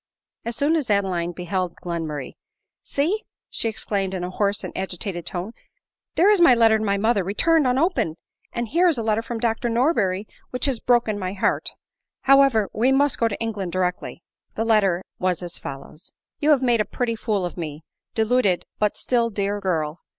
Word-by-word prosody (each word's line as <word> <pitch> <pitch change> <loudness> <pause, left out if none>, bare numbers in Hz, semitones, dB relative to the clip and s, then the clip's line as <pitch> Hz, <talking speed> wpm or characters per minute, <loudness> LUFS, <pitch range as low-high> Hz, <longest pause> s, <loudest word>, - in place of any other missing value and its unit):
As 235 0 -3
soon 290 +6 +2
as 295 -8 -1
Adeline 185 -4 +1
beheld 180 0 -3
Glenmurray, 160 -5 -4 0.3
" - - -62
See 340 +10 +1 0.2
!" - - -69
she 225 - -1
exclaimed 200 -3 -2
in 180 - -3
a 180 - -4
hoarse 200 +1 0
and - - -7
agitated 185 -1 -4
tone, 180 +4 -4 0.3
" - - -64
there 390 +5 +5
is 410 -4 +3
my 265 -8 +7
letter 225 -2 +5
to - - -2
my 200 -1 +1
mother, 210 -1 +2
returned 295 - +2
unopened, 260 - +1 0.4
and 235 -2 -3
here 350 +4 +3
is 325 -6 +2
a 230 - -2
letter 220 0 +1
from 230 0 -5
Dr 230 +1 0
Norberry 230 - +1 0.2
which 250 -1 -1
has 265 -5 0
broken 235 -4 +2
my 185 -1 -3
heart: 195 - 0 0.5
however, 270 -6 +5
we 245 +5 +2
must 280 +1 +2
go 230 - +3
to 210 - -3
England 205 -6 -3
directly." 180 -1 -2 0.3
The 225 - -1
letter 195 -5 +3 0.2
was 185 -1 0
as 175 -1 -6
follows: 140 +5 -9
" - - -66
You 300 - +2
have 280 -4 +4
made 240 -3 +3
a - - -1
pretty 240 -2 -2
fool 210 -4 -1
of 175 - -5
me, 155 -3 -6 0.3
deluded 220 -4 +2
but 210 -1 +1
still 235 -2 +1
dear 205 -1 -2
girl 165 -5 -1
215 Hz, 195 wpm, -23 LUFS, 185-245 Hz, 0.5 s, my